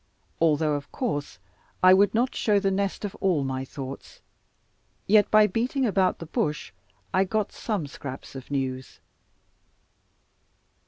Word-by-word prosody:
Although, 155 -2 +2
of 145 -1 -4
course, 145 - -3 0.5
I 185 0 +9
would 200 +2 +4
not 245 +3 +1
show 210 -2 +2
the 195 -1 +1
nest 200 +1 -1
of 200 - -5
all 180 -7 +2
my 130 -1 -2
thoughts, 135 0 -8 0.9
yet 210 +1 +4
by 215 0 +6
beating 245 +6 0
about 190 -4 +2
the 165 - -8
bush, 150 -5 -2 0.4
I 185 - +4
got 210 +2 -1
some 205 -9 -3
scraps 140 -1 -8
of 135 -2 -9
news. 130 -2 -3
185 Hz, 140 wpm, -26 LUFS, 145-210 Hz, 0.9 s, I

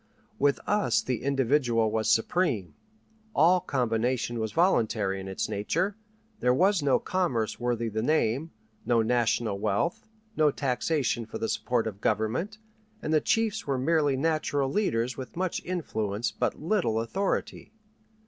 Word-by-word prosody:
With 140 0 +3
us 210 -1 +2
the 125 -3 -2
individual 130 -4 +2
was 110 0 0
supreme; 110 - +1 0.6
all 175 +5 +5
combination 120 -2 -1
was 110 -1 -2
voluntary 110 - +1
in 95 - -7
its 95 - -2
nature; 110 - -1 0.4
there 125 0 +3
was 190 +3 +3
no 140 -2 +3
commerce 135 -13 -1
worthy 120 -1 -1
the 110 0 -2
name, 145 +2 +1 0.3
no 115 -2 +2
national 115 -3 +1
wealth, 105 - -1 0.3
no 155 -4 +4
taxation 130 -3 -1
for - - -6
the 115 - -2
support 120 0 0
of 105 -2 -5
government, 110 - -1 0.5
and 155 - -1
the 155 - +4
chiefs 220 -4 0
were 135 -2 0
merely 145 0 +2
natural 145 -2 0
leaders 125 - 0
with 130 +4 -8
much 185 -1 -2
influence 110 - -2
but - - -2
little 155 - 0
authority. 190 - -2
125 Hz, 140 wpm, -28 LUFS, 110-160 Hz, 0.6 s, all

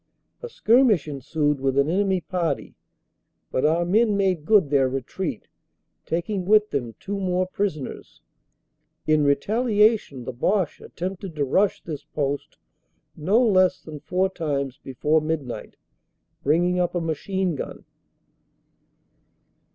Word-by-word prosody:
A 480 - -6
skirmish 230 - +3
ensued 145 +1 -1
with 135 0 0
an 140 +1 +4
enemy 190 +2 +1
party, 170 -6 -2 0.8
but 130 - 0
our 165 +3 +2
men 210 +3 +3
made 185 -6 +1
good 195 -8 +4
their 135 -2 +3
retreat, 135 - -4 0.6
taking 185 +4 -2
with 210 +2 +4
them 120 -5 -3
two 200 0 -4
more 185 -1 0
prisoners. 185 -7 -4 0.8
In 155 -1 +3
retaliation 210 - +2
the 130 - -5
Boche 185 - 0
attempted 185 0 -6
to 145 -2 0
rush 190 +9 +1
this 155 -4 -6
post 140 -1 -3 0.6
no 195 +9 +2
less 185 -4 +3
than 155 -2 -9
four 185 +5 0
times 145 -8 -3
before 150 +4 +1
midnight, 155 -5 -4 0.7
bringing 175 +5 +2
up 175 0 0
a - - +2
machine 175 +3 -1
gun. - - -7
170 Hz, 125 wpm, -24 LUFS, 145-195 Hz, 0.8 s, an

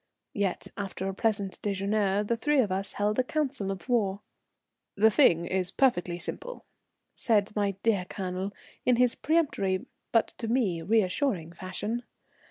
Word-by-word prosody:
Yet, 200 -3 -1
after 195 -1 -4
a 195 - -2
pleasant 200 -2 -1
déjeuner, 200 0 0
the 235 - +2
three 295 +6 +1
of 215 -7 +2
us 195 +1 -2
held 210 +3 0
a - - +4
council 270 -7 -1
of 195 +3 -5
war. 205 -5 +1 0.7
"The 220 +2 +5
thing 170 - +5
is 185 0 +1
perfectly 180 -9 +1
simple," - - -6 0.5
said 210 -2 +2
my 200 -2 0
dear 205 -5 +2
Colonel, 185 +1 -4 0.3
in 250 - +4
his 245 0 +3
peremptory, 275 - +1 0.3
but 230 - +3
to 230 - -3
me 220 -8 +1
reassuring 190 - +1
fashion. 190 +6 -4
205 Hz, 150 wpm, -28 LUFS, 190-235 Hz, 0.7 s, The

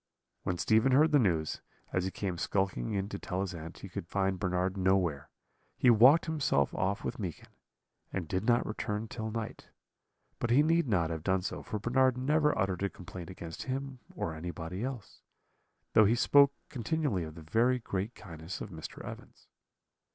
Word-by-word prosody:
"When 90 - -2
Stephen 110 +7 +3
heard 155 +4 +5
the 145 - +6
news, 85 - +1 0.3
as 90 - +1
he - - 0
came 95 -3 -4
skulking 95 -13 -1
in 100 -1 -1
to 100 - -5
tell 95 +1 -3
his 95 -1 -3
aunt 85 0 -8
he - - -8
could 85 -2 -6
find 95 0 0
Bernard 90 +1 0
nowhere, 95 -6 +1 0.5
he 125 - +6
walked 130 +8 +7
himself 145 - +1
off 95 +2 -1
with - - -4
Meekin, 90 -6 -5 0.6
and 90 -4 -3
did 95 +5 -1
not 120 +1 +3
return 105 0 -3
till 110 0 -5
night; 115 0 -5 0.7
but 120 - -1
he 130 +5 +5
need 165 0 +3
not 85 -7 +1
have 80 -1 -3
done 95 +2 +1
so, - - -4
for 110 - -4
Bernard 125 +3 +2
never 150 +3 +2
uttered 95 -1 0
a 100 - +1
complaint 90 -1 -9
against 85 -3 -7
him 135 0 -3 0.2
or 80 - -2
anybody 85 +4 -5
else, 130 -5 -6 0.7
though 110 - +7
he 110 +4 +4
spoke 140 +3 +6 0.2
continually 125 - -1
of 80 -1 -8
the 85 - -10
very 115 +10 +2
great 105 -1 -3
kindness 85 -3 -8
of 105 - -7
Mr. 80 -2 -8
Evans. - - -10
100 Hz, 180 wpm, -31 LUFS, 90-125 Hz, 0.7 s, walked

